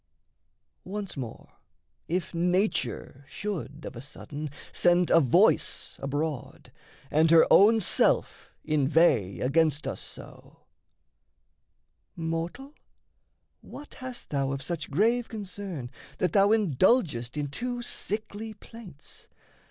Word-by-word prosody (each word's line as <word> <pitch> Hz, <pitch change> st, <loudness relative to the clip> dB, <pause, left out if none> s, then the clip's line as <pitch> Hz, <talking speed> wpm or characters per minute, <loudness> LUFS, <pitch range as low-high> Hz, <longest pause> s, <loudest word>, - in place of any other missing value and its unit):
Once 200 Hz, 0 st, -5 dB
more, 125 Hz, -5 st, -7 dB, 0.6 s
if 175 Hz, 0 st, -2 dB
Nature 175 Hz, -, -1 dB
Should 160 Hz, -7 st, -5 dB
of -, -, -7 dB
a 120 Hz, -, -7 dB
sudden 145 Hz, +2 st, -7 dB, 0.2 s
send 175 Hz, 0 st, +3 dB
a 165 Hz, -, +7 dB
voice 130 Hz, -7 st, +2 dB
abroad, 145 Hz, 0 st, -4 dB, 0.4 s
And 160 Hz, +2 st, +4 dB
her 165 Hz, 0 st, +7 dB
own 220 Hz, +3 st, +7 dB
self 200 Hz, -, +1 dB, 0.2 s
inveigh 140 Hz, -, +2 dB
against 150 Hz, +2 st, +2 dB
us -, -, -4 dB
so: -, -, -13 dB, 1.5 s
"Mortal, 165 Hz, -, -4 dB, 0.9 s
what 290 Hz, -, -11 dB
hast 255 Hz, -1 st, -9 dB
thou 140 Hz, -2 st, 0 dB
of 135 Hz, 0 st, -5 dB
such 160 Hz, 0 st, -4 dB
grave 230 Hz, -, +2 dB
concern 195 Hz, -, -6 dB, 0.3 s
That 180 Hz, -, 0 dB
thou 200 Hz, 0 st, +5 dB
indulgest 175 Hz, -, +2 dB
in 145 Hz, -1 st, -2 dB
too 245 Hz, -, -4 dB
sickly 220 Hz, 0 st, -4 dB
plaints? 205 Hz, -9 st, -13 dB
165 Hz, 105 wpm, -27 LUFS, 145-210 Hz, 1.5 s, a